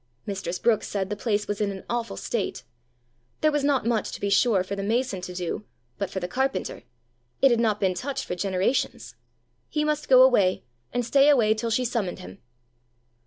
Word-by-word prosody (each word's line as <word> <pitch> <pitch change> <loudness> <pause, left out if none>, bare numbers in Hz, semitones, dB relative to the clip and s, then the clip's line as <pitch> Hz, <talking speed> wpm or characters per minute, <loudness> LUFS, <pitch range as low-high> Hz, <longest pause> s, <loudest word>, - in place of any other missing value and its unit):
Mistress 190 -3 -3
Brookes 225 0 +1
said 195 -1 -3
the - - 0
place 210 -1 -1
was 205 0 -3
in 205 - +1
an 195 -1 -7
awful 235 -1 -3
state. 225 -5 -3 0.8
There 310 - +4
was 295 -1 0
not 280 -4 +2
much, 230 -3 0
to - - -6
be 200 - -1
sure, 205 -4 +3
for 195 +2 -5
the 200 - -4
mason 220 -1 -1
to 180 - -6
do, 180 +3 -3 0.4
but 200 - -2
for 190 - -4
the 180 - -3
carpenter! 265 +7 -2 0.6
It 270 - +5
had 235 - +3
not 215 -3 +1
been 190 -2 +1
touched 265 +10 -4
for - - -4
generations! 185 - -1 0.6
He 300 - 0
must 300 0 -1
go 255 -1 +8
away, 205 -8 +3 0.3
and 245 -1 -1
stay 275 +4 +5
away 230 -7 +5
till 225 +1 -3
she 250 +3 +1
summoned 225 -6 -2
him! 190 +1 -11
215 Hz, 200 wpm, -25 LUFS, 195-255 Hz, 0.8 s, go